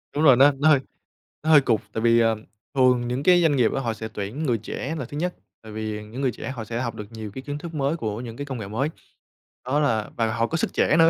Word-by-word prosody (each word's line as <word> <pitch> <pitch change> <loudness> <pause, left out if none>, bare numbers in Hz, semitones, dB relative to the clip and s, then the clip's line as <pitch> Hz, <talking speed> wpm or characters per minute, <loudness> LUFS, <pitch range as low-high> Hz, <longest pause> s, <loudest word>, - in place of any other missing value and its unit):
Đúng 150 - +1
rồi, 135 -4 +8
nó 140 +3 +7
nó 155 +2 +5
hơi 145 -3 +6 0.6
nó 155 - -1
hơi 150 -2 +8
cụt, 115 -5 +1
tại 110 - -2
vì, 115 0 +5
ờ, 115 -1 +3 0.4
thường 125 -2 +4
những 125 +3 -2
cái 175 +2 +6
doanh 160 -4 +3
nghiệp 120 -3 +3
á 135 - -1
họ 115 -3 -1
sẽ 110 0 -6
tuyển 105 +10 -4
người 120 -5 +2
trẻ 135 +8 -4
là 135 - -3
thứ 145 - -7
nhất, 180 +3 -1 0.3
tại 110 - -10
vì 105 0 -4
những 115 +6 -7
người 130 -2 +2
trẻ 120 - -7
họ 120 -5 -6
sẽ 115 +2 -3
học 120 -3 -3
được 105 - -6
nhiều 110 -2 -7
cái 130 - -5
kiến 145 +1 -4
thức 165 +2 -8
mới 140 +2 0
của 110 -6 -3
những 115 -2 -8
cái 145 - -4
công 135 -3 -5
nghệ 105 - -5
mới. 120 +9 -1 0.8
Đó 135 +4 +1
là 115 -8 +1
và 115 -2 +1
họ 115 0 +1
có 165 - -1
sức - - -1
trẻ 155 - +3
nữa, 165 0 +7
125 Hz, 285 wpm, -24 LUFS, 110-145 Hz, 0.8 s, rồi